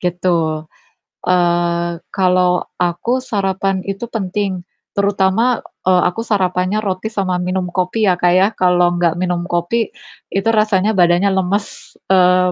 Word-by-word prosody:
Gitu, 170 Hz, -3 st, -1 dB, 0.6 s
eee, 175 Hz, -1 st, +1 dB, 0.2 s
kalo 185 Hz, -1 st, +2 dB, 0.3 s
aku 180 Hz, +9 st, -1 dB
sarapan 195 Hz, -4 st, -1 dB
itu 195 Hz, +3 st, -4 dB
penting, 195 Hz, -3 st, -3 dB, 0.2 s
terutama, 200 Hz, +4 st, +1 dB, 0.2 s
eee, 185 Hz, -1 st, +5 dB
aku 225 Hz, -, -5 dB
sarapannya 185 Hz, 0 st, 0 dB
roti 190 Hz, +1 st, -2 dB
sama 190 Hz, -4 st, -2 dB
minum 180 Hz, 0 st, -2 dB
kopi 185 Hz, +5 st, -1 dB
ya, 180 Hz, -2 st, +2 dB
Kak, 175 Hz, 0 st, +3 dB
ya. 190 Hz, +2 st, +5 dB
Kalau 180 Hz, -3 st, +2 dB
gak 170 Hz, -2 st, +2 dB
minum 175 Hz, -1 st, -2 dB
kopi, 175 Hz, +6 st, 0 dB, 0.4 s
itu 195 Hz, +2 st, -2 dB
rasanya 215 Hz, -2 st, +2 dB
badannya 180 Hz, 0 st, +3 dB
lemes, 190 Hz, +2 st, -3 dB, 0.2 s
eee, 180 Hz, -1 st, +4 dB
185 Hz, 130 wpm, -17 LUFS, 180-200 Hz, 0.6 s, eee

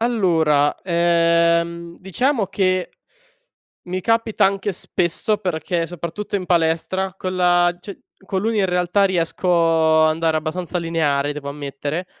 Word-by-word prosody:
Allora, 165 Hz, -11 st, +2 dB
ehm, 170 Hz, -1 st, +1 dB
diciamo 225 Hz, -, 0 dB
che, 185 Hz, -1 st, 0 dB, 0.9 s
mi 185 Hz, +1 st, -4 dB
capita 225 Hz, +2 st, +1 dB
anche 195 Hz, +1 st, 0 dB
spesso, 180 Hz, +4 st, -1 dB
perché 170 Hz, -3 st, -2 dB
soprattutto 175 Hz, +4 st, -5 dB
in 185 Hz, -2 st, -5 dB
palestra, 175 Hz, +2 st, 0 dB
con 185 Hz, -1 st, -4 dB
la 175 Hz, -1 st, +3 dB
cio 200 Hz, -, -8 dB, 0.3 s
con 190 Hz, 0 st, -2 dB
l'uni 220 Hz, +1 st, 0 dB
in 195 Hz, -, +2 dB
realtà 180 Hz, +2 st, +1 dB
riesco 165 Hz, -3 st, +2 dB
ad 155 Hz, -, +4 dB
andare 160 Hz, 0 st, 0 dB
abbastanza 175 Hz, +3 st, -3 dB
lineare 150 Hz, -4 st, 0 dB
devo 145 Hz, -1 st, -7 dB
ammettere. 145 Hz, +4 st, -5 dB
175 Hz, 130 wpm, -20 LUFS, 165-190 Hz, 0.9 s, ad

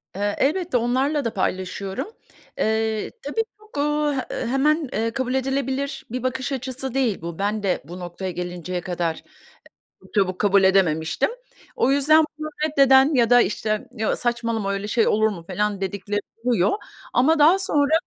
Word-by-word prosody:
Eee, 205 Hz, +1 st, -1 dB
elbette 335 Hz, 0 st, +1 dB
onlarla 260 Hz, +4 st, 0 dB
da 230 Hz, -, -1 dB
paylaşıyorum. 190 Hz, -, -2 dB, 0.5 s
Eee, 220 Hz, 0 st, 0 dB
tabii, 450 Hz, -2 st, -1 dB, 0.2 s
çok, 430 Hz, -7 st, -14 dB
eee, 295 Hz, -1 st, 0 dB
e -, -, -2 dB
hemen, 290 Hz, +3 st, +1 dB
eee, 225 Hz, +1 st, 0 dB
kabul 255 Hz, +1 st, -2 dB
edilebilir 270 Hz, +1 st, -2 dB
bir 250 Hz, 0 st, -3 dB
bakış 260 Hz, +1 st, -2 dB
açısı 260 Hz, -1 st, -4 dB
değil 250 Hz, -7 st, 0 dB
bu. 170 Hz, +1 st, -6 dB
Ben 205 Hz, +1 st, -1 dB
de 190 Hz, -2 st, 0 dB
bu 175 Hz, +4 st, -9 dB
noktaya 180 Hz, +1 st, -5 dB
gelinceye 180 Hz, 0 st, -4 dB
kadar 170 Hz, -2 st, -2 dB
e -, -, -11 dB, 0.8 s
çok -, -, -20 dB
çabuk 185 Hz, -3 st, +1 dB
kabul 200 Hz, -1 st, +4 dB
edememiştim. 165 Hz, -5 st, +2 dB, 0.5 s
O 255 Hz, -, +2 dB
yüzden 300 Hz, +3 st, +5 dB
bunu 310 Hz, 0 st, -4 dB, 0.2 s
reddeden 275 Hz, -1 st, +5 dB
ya 240 Hz, -3 st, +3 dB
da 245 Hz, 0 st, +7 dB
işte, 215 Hz, 0 st, -1 dB
ya 220 Hz, -3 st, -1 dB
saçmalama 230 Hz, -4 st, -1 dB
öyle 200 Hz, +1 st, -3 dB
şey 225 Hz, +1 st, +2 dB
olur 220 Hz, +1 st, +3 dB
mu 180 Hz, -6 st, -6 dB
falan 205 Hz, +2 st, -1 dB
dedikleri 200 Hz, +2 st, -2 dB, 0.2 s
oluyor. 230 Hz, -7 st, +2 dB, 0.4 s
Ama 300 Hz, +6 st, +4 dB
daha 320 Hz, +6 st, +6 dB
sonra, 295 Hz, -6 st, +1 dB
230 Hz, 165 wpm, -23 LUFS, 195-270 Hz, 0.8 s, da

